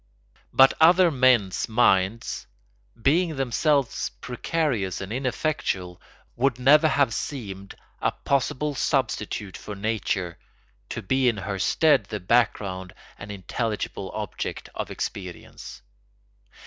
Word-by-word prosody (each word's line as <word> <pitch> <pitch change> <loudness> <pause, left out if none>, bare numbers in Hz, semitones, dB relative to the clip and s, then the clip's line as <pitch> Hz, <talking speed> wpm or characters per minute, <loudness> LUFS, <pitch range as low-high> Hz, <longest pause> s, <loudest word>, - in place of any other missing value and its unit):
But 135 0 +6
other 175 +2 +6
men's 125 -10 +3
minds, 110 - +1 0.5
being 160 +6 +2
themselves 135 +1 +1
precarious 125 - -2
and 95 +2 -5
ineffectual, 125 - -2 0.3
would 130 0 +1
never 150 +5 +6
have 140 -5 +2
seemed 100 -9 -6 0.3
a - - +2
possible 140 +2 -1
substitute 110 -7 -1
for 105 - -8
nature, 100 -4 -2 0.5
to 110 - -5
be 130 +5 +2
in 115 - -2
her 100 0 -4
stead 150 - +3
the 105 +1 -5
background 95 -3 0 0.2
and 100 0 -8
intelligible 100 0 -3
object 105 -2 -5
of - - -4
experience. 90 -9 -7
115 Hz, 110 wpm, -25 LUFS, 100-135 Hz, 0.5 s, But